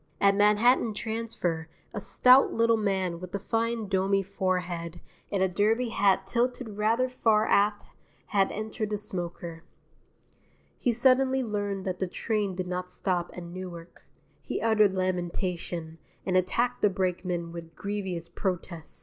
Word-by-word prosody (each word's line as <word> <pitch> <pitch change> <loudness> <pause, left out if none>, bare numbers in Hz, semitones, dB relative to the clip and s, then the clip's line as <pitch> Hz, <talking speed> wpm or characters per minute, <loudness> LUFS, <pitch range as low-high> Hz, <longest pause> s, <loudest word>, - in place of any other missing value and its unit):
At 200 0 +5
Manhattan 210 +3 +4
Transfer 215 -8 -3 0.2
a 205 - -4
stout 255 +6 +6
little 230 0 +3
man 190 -5 -1
with 185 +1 -7
a - - -1
fine 225 +1 -1
domy 195 0 +2
forehead 180 -3 -2 0.3
and 195 -2 +1
a - - +4
derby 215 +6 +1
hat 195 -3 +2
tilted 245 +3 -1
rather 230 +4 +2
far 225 -4 +2
aft 205 0 +2 0.4
had 195 -1 +2
entered 215 0 -3
the 210 - -1
smoker. 175 -4 -5 1.2
He 245 - +2
suddenly 260 +2 +3
learned 205 -3 -3
that 185 -1 -3
the 190 - 0
train 205 0 -1
did 185 0 -3
not 180 0 -3
stop 180 -2 -1
at 180 - -5
Newark. 175 -1 -9 0.4
He - - -3
uttered 215 -3 +3
lamentation, 175 -2 -2 0.3
and 185 - 0
attacked 235 +7 +1
the 210 - +5
brakeman 180 -2 -2
with 165 -1 -9
grievous 190 -4 -4
protest. 175 -4 -4
195 Hz, 140 wpm, -28 LUFS, 180-220 Hz, 1.2 s, stout